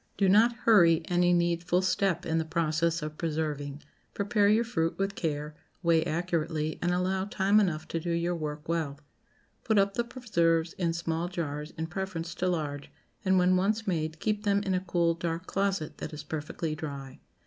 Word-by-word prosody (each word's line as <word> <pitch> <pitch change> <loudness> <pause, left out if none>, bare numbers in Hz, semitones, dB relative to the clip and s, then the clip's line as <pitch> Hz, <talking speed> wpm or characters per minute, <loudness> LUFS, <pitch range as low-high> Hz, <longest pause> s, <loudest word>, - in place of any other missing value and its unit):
Do 195 - +3
not 220 +5 +5
hurry 175 -9 +5
any 175 0 +3
needful 175 +1 +2
step 185 -2 +1
in 165 0 +1
the - - +1
process 165 0 0
of 155 0 -6
preserving. 150 -3 -3 0.3
Prepare 205 0 +2
your 220 +3 +4
fruit 165 -8 -1
with 195 0 -1
care, 150 -4 -3 0.3
weigh 165 -1 +4
accurately, 160 -2 -1
and 175 - +1
allow 185 +1 0
time 200 +1 +3
enough 160 -6 0
to 165 - -1
do 170 - -4
your 170 +1 0
work 150 -2 -5
well. 160 -4 -2 0.6
Put 220 -2 +2
up 195 0 +3
the 235 - 0
preserves 170 -10 0
in 170 -3 -1
small 165 0 -2
jars 150 -4 -4
in 160 - -2
preference 175 -1 -4
to 185 - -1
large, 145 -5 -2 0.3
and, 190 -1 +3
when 180 0 +4
once 210 +4 +1
made, 160 -4 -2
keep 210 -1 -1
them 200 -1 +2
in 195 -2 0
a 185 - +2
cool, 170 -2 +1
dark 165 +1 -3
closet 195 -6 -1
that - - -6
is 150 0 -6
perfectly 155 +1 -4
dry. 140 -4 -7
170 Hz, 180 wpm, -29 LUFS, 160-190 Hz, 0.6 s, not